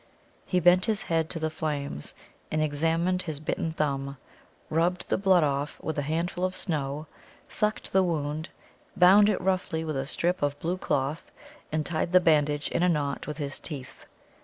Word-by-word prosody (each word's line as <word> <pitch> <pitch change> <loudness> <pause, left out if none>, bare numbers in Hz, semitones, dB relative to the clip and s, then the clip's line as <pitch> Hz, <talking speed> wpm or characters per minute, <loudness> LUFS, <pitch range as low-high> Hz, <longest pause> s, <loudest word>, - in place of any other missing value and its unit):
He 180 - +2
bent 180 +1 +5
his 215 -2 0
head 165 -1 0
to - - -3
the 160 -1 -1
flames, 145 - -4 0.3
and 155 - 0
examined 165 +4 +1
his 160 -5 -4
bitten 160 +1 -2
thumb, 140 -3 -2 0.5
rubbed 175 +3 +1
the - - +2
blood 190 -4 +4
off 145 0 -1
with 160 - -3
a - - +1
handful 170 +5 -2
of 185 0 0
snow, 150 -4 -2 0.4
sucked 210 0 -1
the 190 - +5
wound, 155 -2 -2 0.5
bound 195 +4 +7
it 210 - +1
roughly 185 -3 0
with 155 -2 -3
a 135 0 -2
strip 175 +4 -1
of 145 0 0
blue 175 +3 -1
cloth, 145 +1 -1 0.4
and 155 0 0
tied 170 +1 -2
the 185 - +8
bandage 150 -3 +2
in - - -1
a 180 - +4
knot 145 -4 -1
with 150 -1 -4
his 140 -3 -3
teeth. 140 -5 -7
160 Hz, 180 wpm, -27 LUFS, 145-180 Hz, 0.5 s, the